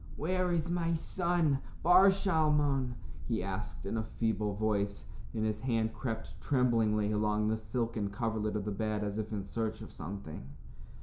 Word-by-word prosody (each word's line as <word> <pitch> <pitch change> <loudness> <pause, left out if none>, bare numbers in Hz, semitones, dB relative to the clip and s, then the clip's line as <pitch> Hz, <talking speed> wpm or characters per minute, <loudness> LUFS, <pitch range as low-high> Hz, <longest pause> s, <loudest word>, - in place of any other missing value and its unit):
"Where 180 +4 0
is 170 -1 +1
my 170 -1 +1
son, 170 -4 +1 0.2
Bar 180 +4 +8
Shalmon?" 150 -9 +2 0.3
he 115 -6 0
asked 95 -1 -5
in 100 - -1
a 110 - 0
feeble 110 -2 -1
voice, 100 -1 0 0.3
and 110 -1 0
his 110 -1 -1
hand 115 -2 0
crept 110 +1 -5
tremblingly 115 -6 +2
along 105 0 +1
the 110 - +2
silken 110 -1 -2
coverlet 110 0 -1
of 105 -2 -2
the 105 - -1
bed 105 +1 -1
as 105 +1 -2
if 110 0 -4
in 105 -2 -2
search 110 +1 -3
of - - -10
something. 85 -5 -6
110 Hz, 165 wpm, -32 LUFS, 105-145 Hz, 0.3 s, Bar